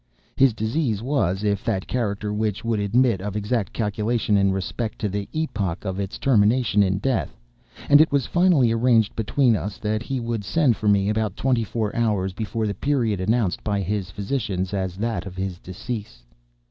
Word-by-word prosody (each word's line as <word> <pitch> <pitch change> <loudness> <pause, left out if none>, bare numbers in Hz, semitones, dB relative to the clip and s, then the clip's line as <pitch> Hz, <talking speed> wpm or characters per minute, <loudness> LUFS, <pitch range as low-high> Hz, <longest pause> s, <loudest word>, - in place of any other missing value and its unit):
His 135 -1 +5
disease 110 0 -1
was 105 -8 0
of 100 -2 0
that 95 -5 -1
character 105 -4 -2
which 105 0 -2
would 115 -2 0
admit 110 0 +2
of 100 0 -4
exact 105 0 -1
calculation 110 0 0
in 100 -1 +3
respect 95 +4 -3
to 105 - -2
the 100 +1 -4
epoch 105 - -2
of 95 0 -3
its 100 -1 -4
termination 115 -2 +3
in 95 -1 +2
death; 125 +4 -1 0.5
and 145 +1 +7
it 160 - +3
was 140 -2 +1
finally 175 -9 +3
arranged 115 -2 +2
between 115 +2 +2
us 100 -1 -4
that 110 0 -2
he 130 +2 -3
would 115 -3 -3
send 125 - +2
for 105 - -3
me 100 -1 +3
about 105 -2 -1
twenty 125 -3 +1
four 110 -1 -3
hours 105 -5 0
before 110 +2 -3
the 105 - -1
period 115 -4 0
announced 110 -1 0
by 100 -2 0
his 100 0 -2
physicians 100 -3 -3
as 95 -2 -2
that 105 -3 -2
of 90 - -9
his 95 -2 -4
decease. 95 - -7
105 Hz, 185 wpm, -23 LUFS, 100-120 Hz, 0.5 s, and